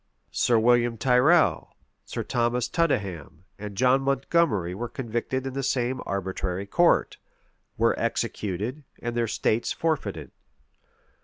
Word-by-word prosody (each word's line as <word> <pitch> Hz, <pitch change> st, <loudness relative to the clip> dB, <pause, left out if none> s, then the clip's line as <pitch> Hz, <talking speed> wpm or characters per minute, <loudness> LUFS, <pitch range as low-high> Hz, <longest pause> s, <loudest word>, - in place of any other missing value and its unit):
[*] -, -, -48 dB
Sir 120 Hz, -, +2 dB
William 120 Hz, 0 st, +3 dB
Tyrrel, 125 Hz, -, +3 dB, 0.3 s
Sir -, -, -4 dB
Thomas 120 Hz, 0 st, 0 dB
Tudenham, 95 Hz, -, -2 dB
and 105 Hz, -1 st, -7 dB
John 130 Hz, +2 st, +4 dB
Montgomery 135 Hz, -, +1 dB
were 120 Hz, +5 st, -5 dB
convicted 125 Hz, +2 st, -3 dB
in 135 Hz, -, -4 dB
the 135 Hz, -, -2 dB
same 130 Hz, -1 st, -1 dB
arbitrary 95 Hz, -1 st, -3 dB
court; 175 Hz, +12 st, +2 dB, 0.6 s
were -, -, +3 dB
executed, 110 Hz, -, -2 dB, 0.2 s
and 120 Hz, 0 st, -4 dB
their 120 Hz, -1 st, +1 dB
estates 110 Hz, +1 st, 0 dB
forfeited. 105 Hz, -, -2 dB
120 Hz, 125 wpm, -26 LUFS, 100-130 Hz, 0.6 s, John